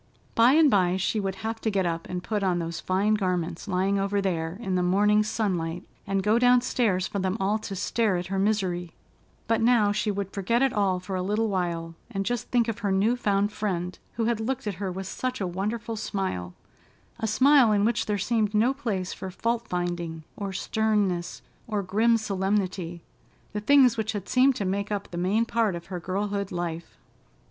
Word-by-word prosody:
By 235 +3 +5
and 315 0 +6
by 185 -2 +3
she 200 +3 0
would 195 -2 -2
have 225 0 -3
to 220 - 0
get 195 -3 0
up 165 -1 -3
and 180 -1 -4
put 210 +2 -1
on 185 -3 +1
those 170 -1 -3
fine 195 +3 +1
garments 180 -3 -1
lying 195 +1 +1
over 200 +1 0
there 170 -3 -2
in 195 -6 -3
the 180 - +2
morning 205 +4 +3
sunlight, 185 -6 -2 0.2
and 195 -1 0
go 215 +3 +3
downstairs, 240 -6 +3
for 200 - -3
them 190 +2 -1
all 205 +3 +1
to 200 -2 -6
stare 200 0 +1
at 175 - -3
her 195 +2 -2
misery; 185 -4 0 0.5
but 225 0 +1
now 225 -3 +4
she 210 +1 0
would 200 -1 -3
forget 230 +6 +1
it 265 -1 +2
all 195 -4 +1
for 185 +1 -5
a 185 - -1
little 210 +4 0
while, 170 -3 -2 0.2
and 195 0 -3
just 245 0 -2
think 240 -2 +2
of 230 - -3
her 200 -1 -1
new 205 +5 +3
found 205 -3 +1
friend, 180 -4 -3
who 230 - -1
had 235 -1 +1
looked 260 +3 -2
at 210 - -1
her 190 -2 -1
with 190 +1 -5
such 255 +6 -3
a 195 - -1
wonderful 210 +6 -3
smile—a 195 - -6
smile 260 +1 +5
in 205 -1 +3
which 235 0 0
there 210 -1 0
seemed 215 0 0
no 235 +5 +3
place 210 -10 -3
for 190 - -6
fault 230 +5 -2
finding 175 -2 -3
or 200 -2 -4
sternness 200 -3 -1 0.2
or 210 -3 -1
grim 220 +5 +3
solemnity—the 195 -2 -3
things 255 0 +5
which 220 0 -1
had 200 -2 -5
seemed 260 +1 +4
to 200 - -2
make 200 +2 -2
up 205 -1 -3
the - - -6
main 205 +6 +2
part 225 -5 +1
of 170 0 -7
her 180 - -2
girlhood 200 +2 -2
life. 170 -2 -4
200 Hz, 200 wpm, -26 LUFS, 185-220 Hz, 0.5 s, and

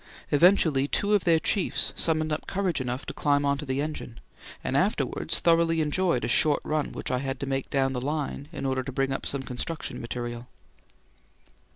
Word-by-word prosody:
Eventually, 150 -3 +4
two 205 +7 0
of 205 - +2
their 165 -2 +5
chiefs 185 +3 +1
summoned 155 -1 +1
up 150 - -4
courage 185 -7 -1
enough 125 +1 -3
to - - -5
climb 145 -1 +1
on 140 0 +1
to 150 - -6
the 130 +2 0
engine, 150 -6 -6 0.4
and - - -2
afterwards - - 0
thoroughly 165 -1 +3
enjoyed 155 -2 +1
a - - -1
short 145 +4 +4
run 155 -1 -1
which - - -4
I 125 - +1
had 135 -1 -3
to - - -1
make 135 -1 -2
down 135 -1 +1
the 125 - -3
line 145 0 -3
in 145 -4 -5
order 130 -1 0
to 135 - -6
bring 135 +1 0
up 135 - -3
some 140 -1 -2
construction 135 +6 -4
material. 120 0 -5
145 Hz, 195 wpm, -27 LUFS, 135-160 Hz, 0.4 s, their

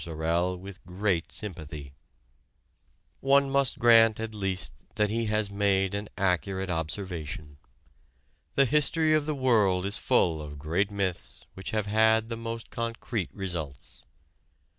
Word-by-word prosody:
Sorel 85 +3 -1
with 95 +1 -11
great 90 -1 -1
sympathy. 75 -8 -7 1.3
One 140 0 +3
must 140 -2 +2
grant 115 -2 +6
at 110 -1 -4
least 95 -3 -2 0.2
that 105 -1 +1
he 115 +1 0
has 105 -1 +1
made 100 -1 +1
an 105 +1 -3
accurate 95 0 0
observation. 80 -3 -4 1.0
The 140 - +5
history 155 +3 +3
of 155 -1 +2
the 155 - 0
world 105 -9 +3
is 100 +1 0
full 80 -3 +2
of 75 -1 -8
great 85 +7 0
myths 95 -11 -4
which 95 - -7
have 110 -2 -1
had 110 +2 +3
the 115 - -3
most 115 0 -6
concrete 115 -3 -3
results. 85 -9 -6
100 Hz, 135 wpm, -28 LUFS, 90-115 Hz, 1.3 s, grant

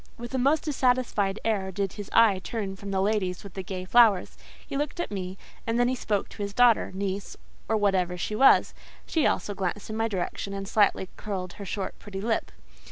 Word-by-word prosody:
With 240 +2 -8
a 260 - +1
most 280 +5 +3
dissatisfied 250 -8 +1
air 200 -4 0
did 195 0 -2
his 205 -2 -7
eye 220 -5 +5
turn 195 -1 -4
from 200 +1 -8
the 190 -1 +1
ladies 195 -3 0
with 200 -3 -10
the 190 - -4
gay 185 0 -5
flowers; 215 -2 +4 0.3
he 280 - -6
looked 295 +4 -2
at 345 - -2
me, 190 -1 -4 0.3
and 230 +1 +1
then 245 - +4
he 255 - +1
spoke 210 -5 -1
to - - -9
his 200 0 -4
daughter, 245 -2 +4
niece, 195 0 -3 0.3
or 220 - +3
whatever 185 -3 +1
she 210 +4 -3
was: 265 +5 +5 0.3
she 320 -3 +2
also 205 - -1
glanced 195 +2 -3
in 215 - -3
my 225 0 +1
direction, 195 0 -3
and 195 0 -5
slightly 205 -3 +2
curled 185 -4 -4
her 200 - -8
short, 195 0 -4
pretty 195 -2 -7
lip. 225 +3 -1
205 Hz, 210 wpm, -27 LUFS, 190-230 Hz, 0.3 s, eye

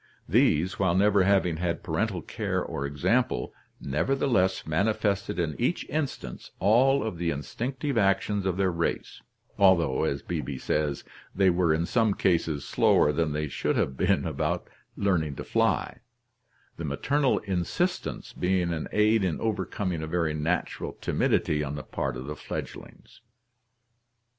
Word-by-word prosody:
These, 85 +4 +2
while 95 -3 +2
never 100 0 +4
having 95 -4 +2
had 85 0 -2
parental - - -1
care - - -2
or 70 - -3
example, 90 - 0 0.3
nevertheless 95 - +1
manifested 100 +3 0
in 85 -3 -1
each 125 +9 0
instance 150 -1 -4
all 125 +8 +4
of 110 -7 -4
the 85 -1 0
instinctive 120 - -2
actions 100 0 +1
of 95 -1 -1
their 95 -2 +2
race, 85 -1 -3 0.4
although, 85 -9 +4
as 70 - -2
Beebe 75 -5 -4
says, 75 0 -1 0.3
they 95 -1 +4
were 85 -2 +2
in 80 +2 +1
some 110 -1 +2
cases 80 -5 +1
slower 75 - +3
than 80 0 0
they 75 +1 -1
should 70 - -1
have 65 - 0
been - - +1
about - - -2 0.3
learning 85 -8 0
to - - -6
fly, - - 0 0.8
the 85 - -5
maternal 135 - +1
insistence 105 - -2
being 90 -1 0
an 80 - -3
aid 105 0 +3
in 90 -4 -1
overcoming 100 -5 -2
a 80 - -4
very 80 -1 0
natural 80 +3 -2
timidity 75 -1 +1
on 75 0 -4
the 75 - -6
part 65 -1 -3
of 65 - -7
the 75 +2 -5
fledgelings. - - -8
90 Hz, 145 wpm, -27 LUFS, 75-105 Hz, 0.8 s, never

